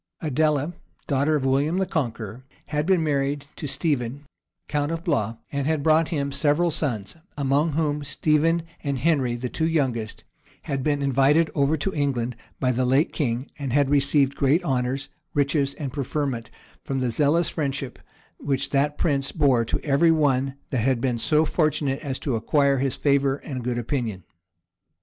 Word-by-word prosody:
Adela, 150 +1 +1 0.3
daughter 145 +2 +1
of 140 -3 -1
William 140 +6 +2
the 190 - +1
Conqueror, 120 - -3 0.3
had 150 +1 -1
been 185 -4 +3
married 140 -1 0
to 150 - -5
Stephen, 140 -2 -1 0.4
count 145 +1 -1
of 165 0 -3
Blois, 115 - 0 0.2
and 140 -1 -1
had 155 -2 0
brought 160 +1 +4
him 140 -3 -1
several 150 +4 +2
sons; 120 -7 -2 0.2
among 145 +3 +1
whom 150 -1 0
Stephen 155 +3 +1 0.2
and 140 -2 -1
Henry, 135 -5 +1
the 125 +1 -3
two 160 +6 -1
youngest, 130 -9 -1 0.4
had 135 -1 -2
been 145 0 0
invited 140 +4 +3
over 140 +2 +2
to 190 +6 -2
England 125 -5 -1 0.2
by 130 -1 +2
the 130 +1 0
late 135 +5 +2
king 125 -4 -1
and 135 -4 -3
had 140 -1 +3
received 140 -1 +3
great 140 +6 +2
honors, 130 +1 -1 0.3
riches, 140 -1 +1
and 140 -4 -5
preferment, 135 -4 -2 0.3
from 135 -1 -2
the 125 -2 0
zealous 150 +7 +2
friendship 140 -4 -3 0.4
which 140 0 -1
that 145 +1 +1
prince 140 -4 +1
bore 135 -6 +3
to 115 - -2
every 150 +3 +3
one 135 -4 +2 0.2
that 130 - 0
had 130 +1 +2
been 120 -1 -1
so 155 +5 +3
fortunate 150 -4 0
as 135 -4 -3
to 135 -5 -2
acquire 140 +4 +2
his 135 -1 0
favor 140 -1 +2
and 130 -3 -6
good 120 0 -1
opinion. 120 - -2
140 Hz, 170 wpm, -24 LUFS, 130-150 Hz, 0.4 s, brought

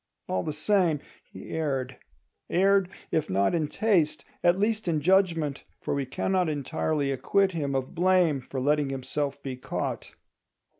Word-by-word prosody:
All 95 - 0
the 155 - -3
same, 165 0 +2 0.2
he - - -11
erred; 135 -5 -2 0.5
erred, 195 +1 +3 0.2
if 155 - 0
not 100 - +2
in 160 -3 +1
taste, 155 -8 +1 0.2
at 175 +1 +4
least 215 0 0
in 160 -3 +2
judgment: 165 -4 +2 0.2
for - - -3
we 140 -2 -1
cannot 180 +6 0
entirely 145 0 -1
acquit 190 +9 +2
him 145 -5 -2
of 130 -1 -2
blame 175 -5 +3
for 130 +1 -5
letting 145 +1 +2
himself 140 +1 -3
be 135 -2 -4
caught. 130 - -4
155 Hz, 150 wpm, -27 LUFS, 140-185 Hz, 0.5 s, at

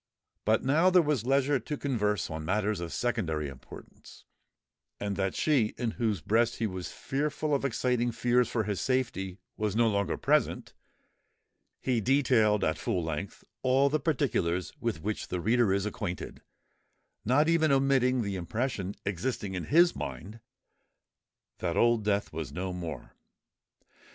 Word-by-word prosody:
But 110 +1 +3
now 150 +6 +3
that 185 - +5
there 180 - +7
was 130 -6 0
leisure 135 +1 +3
to 145 +5 -5
converse 105 - 0
on 80 0 -4
matters 105 +4 0
of 85 -1 -5
secondary 90 -11 -1
importance, 70 - -13 0.7
and 100 -1 -2
that 95 0 -1
she 130 -9 +2
in 120 -3 -1
whose 110 -7 -1
breast 115 +7 +2
he 115 - -2
was 95 -3 -4
fearful 150 +2 -2
of 140 - +1
exciting 125 -2 0
fears 120 +1 +2
for 115 - 0
his 100 -2 -2
safety 125 -8 -1 0.2
was 105 -2 -1
no 115 0 +4
longer 100 -4 0
present, - - +1 1.1
he 125 -3 0
detailed 115 -5 +3
at 80 -2 0
full 95 -8 -1
length 80 +4 -5 0.2
all 135 +2 +3
the 155 +2 +1
particulars 105 - 0
with 115 -9 -3
which 105 +1 -3
the 90 - -3
reader 115 +2 +2
is 100 +1 +1
acquainted, 105 -5 -5 0.8
not 140 +7 +3
even 165 -2 +3
omitting 135 -2 +3
the 100 -2 -3
impression 100 +1 -3
existing 100 +1 -2
in 90 -3 -3
his 170 +4 +4
mind 80 - -6 1.2
that - - -2
Old 120 -2 +3
Death 100 -3 0
was 80 -3 -5
no 90 +4 -4
more. 85 -7 -6
110 Hz, 150 wpm, -29 LUFS, 95-130 Hz, 1.2 s, there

